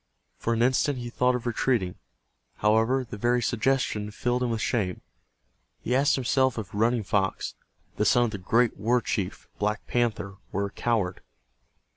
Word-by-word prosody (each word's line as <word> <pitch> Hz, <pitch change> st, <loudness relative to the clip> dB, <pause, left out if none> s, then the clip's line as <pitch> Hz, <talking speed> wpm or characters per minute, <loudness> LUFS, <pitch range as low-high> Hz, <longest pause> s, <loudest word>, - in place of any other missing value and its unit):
For 115 Hz, -, 0 dB
an 115 Hz, -, +2 dB
instant 130 Hz, +2 st, +2 dB
he 120 Hz, -1 st, -6 dB
thought 125 Hz, 0 st, +2 dB
of 125 Hz, -, -4 dB
retreating. 115 Hz, -6 st, 0 dB, 0.6 s
However, 115 Hz, +5 st, +2 dB
the 105 Hz, -, -7 dB
very 120 Hz, +3 st, +2 dB
suggestion 115 Hz, -2 st, 0 dB
filled 120 Hz, +4 st, -1 dB
him 125 Hz, -, +1 dB
with 115 Hz, -1 st, -1 dB
shame. 100 Hz, -7 st, -1 dB, 0.8 s
He 125 Hz, -, -2 dB
asked 140 Hz, +2 st, +4 dB
himself 130 Hz, -1 st, +1 dB
if 105 Hz, -4 st, -5 dB
Running 115 Hz, +2 st, +2 dB
Fox, 95 Hz, 0 st, -1 dB, 0.4 s
the 105 Hz, -, +1 dB
son 120 Hz, +1 st, +5 dB
of 120 Hz, -, 0 dB
the 100 Hz, -, -5 dB
great 115 Hz, +5 st, +2 dB
war 120 Hz, +5 st, +2 dB
chief, 100 Hz, -5 st, -3 dB
Black 105 Hz, +1 st, -1 dB
Panther, 115 Hz, -5 st, -1 dB
were 100 Hz, +1 st, -1 dB
a 100 Hz, -, -6 dB
coward. 105 Hz, -6 st, -1 dB
115 Hz, 165 wpm, -27 LUFS, 105-125 Hz, 0.8 s, son